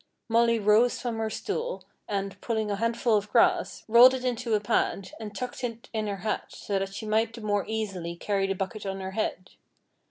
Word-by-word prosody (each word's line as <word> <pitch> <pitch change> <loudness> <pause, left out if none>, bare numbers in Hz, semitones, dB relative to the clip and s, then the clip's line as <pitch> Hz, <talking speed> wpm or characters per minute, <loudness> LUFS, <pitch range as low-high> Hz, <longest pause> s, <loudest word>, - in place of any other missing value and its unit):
Molly 230 0 +3
rose 215 +3 +4
from 235 -2 -3
her 220 0 -1
stool, - - -4 0.2
and, 200 -1 -3
pulling 220 -3 -1
a 200 - -1
handful 230 +1 +1
of 205 0 -3
grass, 230 - +2
rolled 240 +3 +8
it 255 0 -5
into 240 -2 0
a - - +2
pad, 200 -1 0
and 210 -2 -7
tucked 250 +2 -5
it 230 -1 -5
in 215 -1 -1
her 200 -1 -2
hat, 215 - -1
so 200 -1 -3
that 195 0 -4
she 220 - -5
might 220 +1 +1
the 230 - -9
more 205 -1 0
easily 195 -6 -3
carry 195 +2 0
the 195 - -1
bucket 195 +3 -4
on 195 -1 -4
her 190 0 -5
head. 190 -3 -3
215 Hz, 210 wpm, -27 LUFS, 200-230 Hz, 0.2 s, rolled